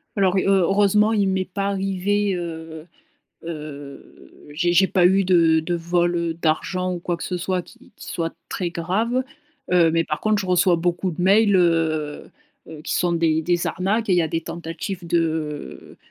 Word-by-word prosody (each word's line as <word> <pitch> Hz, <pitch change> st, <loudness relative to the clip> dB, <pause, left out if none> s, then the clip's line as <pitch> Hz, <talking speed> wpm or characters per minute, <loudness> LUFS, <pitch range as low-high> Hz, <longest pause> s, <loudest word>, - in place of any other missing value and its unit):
Alors, 195 Hz, -2 st, +2 dB
heu, -, -, +2 dB
heureusement 200 Hz, +3 st, +3 dB
il 205 Hz, -3 st, +2 dB
m'est 190 Hz, 0 st, 0 dB
pas 195 Hz, +2 st, -3 dB
arrivé, 195 Hz, +1 st, 0 dB
heu 160 Hz, -2 st, -7 dB, 0.6 s
heu, 150 Hz, -4 st, -9 dB, 0.2 s
j'ai 175 Hz, +4 st, 0 dB
j'ai 190 Hz, +2 st, +5 dB
pas 180 Hz, -2 st, +2 dB
eu 195 Hz, +1 st, +3 dB
de 165 Hz, -3 st, +4 dB
de 175 Hz, +2 st, -3 dB
vol, 175 Hz, +1 st, 0 dB
heu, 170 Hz, -1 st, -1 dB
d'argent 180 Hz, +3 st, -1 dB
ou 175 Hz, -, -6 dB
quoi 175 Hz, 0 st, -2 dB
que -, -, -7 dB
ce 180 Hz, -, -3 dB
soit 180 Hz, +1 st, -1 dB
qui -, -, -19 dB
qui -, -, -12 dB
soit 165 Hz, -1 st, -3 dB
très 180 Hz, -3 st, -3 dB
grave, 215 Hz, +10 st, -1 dB, 0.5 s
heu, 175 Hz, -2 st, +4 dB
mais 165 Hz, +1 st, +1 dB
par 150 Hz, -, -3 dB
contre 215 Hz, -1 st, +1 dB
je 190 Hz, -, -4 dB
reçois 180 Hz, 0 st, +3 dB
beaucoup 175 Hz, +2 st, -1 dB
de 170 Hz, -, -7 dB
mails, 200 Hz, +2 st, +4 dB
heu 160 Hz, -4 st, 0 dB, 0.4 s
heu, 155 Hz, -2 st, -9 dB
qui -, -, -3 dB
sont 175 Hz, -1 st, +1 dB
des 160 Hz, -1 st, +1 dB
des 175 Hz, +1 st, 0 dB
arnaques 205 Hz, +5 st, -1 dB
et 190 Hz, -, +3 dB
il -, -, +2 dB
y 175 Hz, -, +3 dB
a 160 Hz, -, -1 dB
des 165 Hz, -, -2 dB
tentatives 170 Hz, +2 st, -6 dB
de 160 Hz, -3 st, -3 dB
175 Hz, 190 wpm, -22 LUFS, 165-190 Hz, 0.6 s, j'ai